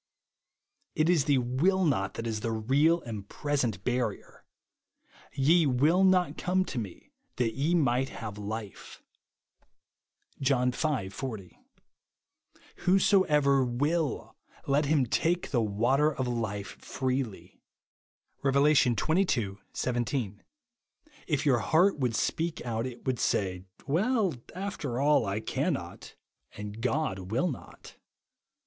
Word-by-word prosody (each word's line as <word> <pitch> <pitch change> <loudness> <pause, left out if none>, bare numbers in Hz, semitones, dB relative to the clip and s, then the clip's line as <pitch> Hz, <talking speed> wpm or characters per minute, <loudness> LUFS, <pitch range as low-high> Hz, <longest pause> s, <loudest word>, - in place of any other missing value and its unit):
It 155 +2 +2
is 155 -6 +2
the 145 -3 +3
will 150 +10 +1
not 95 -10 0
that 115 - -5
is 110 -2 -2
the 115 +2 -2
real 140 +10 +2
and 105 -4 -7
present 130 - -1
barrier. 125 -5 -3 0.9
"Ye 155 +4 +4
ivill 150 +9 +3
not 185 -1 +3
come 185 +1 +1
to 125 - -4
me 100 -6 -8 0.2
that 115 -3 0
ye 150 +7 +1
might 135 -4 +2
have 105 -2 -7
life," 105 0 -7 1.4
(John 125 -2 +2
v. - - -9 0.3
40\ 105 -4 -7 1.2
"Whosoever 150 -8 +3
^uill, 145 +6 -1 0.3
let 145 +2 +2
him 145 -2 +2
take 170 +8 0
the 120 -5 +2
water 120 +8 +2
of 130 -3 -3
life 110 -4 -4
freely," 130 -5 -3 0.8
(Rev. 140 +2 +3
xxii. 125 - +2 0.2
17). 120 -4 -2 0.8
If 150 -2 0
your 130 -5 +4
heart 170 - +3
would 125 -4 0
speak 165 +6 -1
out 115 +1 -2
it 125 -1 -10
would 130 -3 -1
say; 90 -2 -1
" - - -50
Well, 200 - +1 0.2
after 180 -10 -4
all, 140 -5 +3
I 100 +3 -2
cannot, - - -3 0.4
and 105 +2 -7
God 130 -5 0
^vill 130 - +1
not." 125 - -11
130 Hz, 120 wpm, -29 LUFS, 115-155 Hz, 1.4 s, Ye